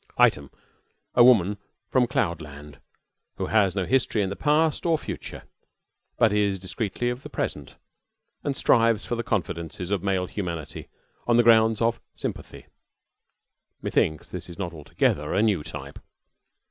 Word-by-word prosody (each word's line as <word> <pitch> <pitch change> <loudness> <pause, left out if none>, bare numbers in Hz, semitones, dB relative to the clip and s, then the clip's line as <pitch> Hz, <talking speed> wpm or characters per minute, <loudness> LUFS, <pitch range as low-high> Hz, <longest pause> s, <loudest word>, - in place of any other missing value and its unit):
Item, 70 -1 +3 0.6
a 120 - +6
woman 105 -5 +5 0.3
from 125 -2 +3
cloud 85 -9 -1
land 75 -2 -11 0.6
who - - -3
has 100 -4 +2
no 95 -2 0
history 120 -4 +1
in 95 - -2
the - - -3
past 155 +3 +1
or 165 -2 +2
future, - - -7 0.7
but 110 -2 +4
is 100 -2 +1
discreetly 100 +5 -3
of 125 +1 -6
the - - -9
present, - - -4 0.7
and 140 -2 -2
strives 115 -3 +3
for - - -3
the 115 - -2
confidences 90 -4 -3
of 100 -3 0
male 95 -1 0
humanity 85 -6 -5 0.4
on 120 -1 +4
the 120 - +6
grounds 110 -1 +5
of 115 0 0
"sympathy" - - -6 1.2
(methinks 80 -1 0
this - - -7
is 85 - -10
not 90 -4 -4
altogether 75 -1 -1
a 105 - +3
new 105 -7 +2
type). 70 -3 -8
100 Hz, 150 wpm, -25 LUFS, 85-115 Hz, 1.2 s, a